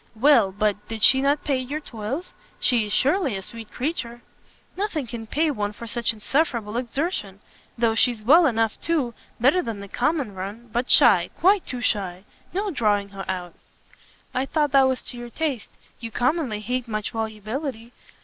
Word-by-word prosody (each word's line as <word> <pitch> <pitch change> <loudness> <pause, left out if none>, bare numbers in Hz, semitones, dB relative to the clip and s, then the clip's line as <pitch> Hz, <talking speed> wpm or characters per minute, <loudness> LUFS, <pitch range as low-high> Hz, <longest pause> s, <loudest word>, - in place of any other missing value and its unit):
"Well 230 -4 +5
but, 210 +1 -1
did 225 -2 -5
she 265 0 +7
not 285 +2 +1
pay 280 -3 +1
your 270 +4 -4
toils? 260 +5 -6 0.3
She 235 -4 +3
is - - -6
surely 280 - +2
a 190 - -7
sweet 225 +2 -9
creature." 245 -4 -3 0.5
"Nothing 370 -8 -2
can 230 -1 -7
pay 310 +6 +1
one 210 -5 -2
for 235 - -9
such 235 0 0
insufferable 230 -1 -1
exertion! 245 - -2 0.4
though 230 -1 +2
she's 230 -1 +2
well 315 +8 +6
enough, 225 -3 0
too 295 -8 0 0.3
better 275 +10 +4
than 225 - -5
the 200 - -8
common 255 - -1
run, 205 +5 -7
but 240 +2 -1
shy, - - +6
quite 385 +1 +3
too 250 -1 -4
shy; 190 -5 -1 0.3
no 400 +2 -1
drawing 205 - +1
her 195 -1 -8
out." 180 -2 -4 0.8
"I 260 +2 -1
thought 300 -2 +1
that 270 -1 +6
was 260 -1 -1
to 245 - -7
your 240 0 -7
taste. 275 -3 -3 0.3
You 230 - -6
commonly 245 -1 0
hate 250 +2 -2
much 215 -2 -3
volubility. 225 +3 -4
240 Hz, 175 wpm, -24 LUFS, 215-280 Hz, 0.8 s, she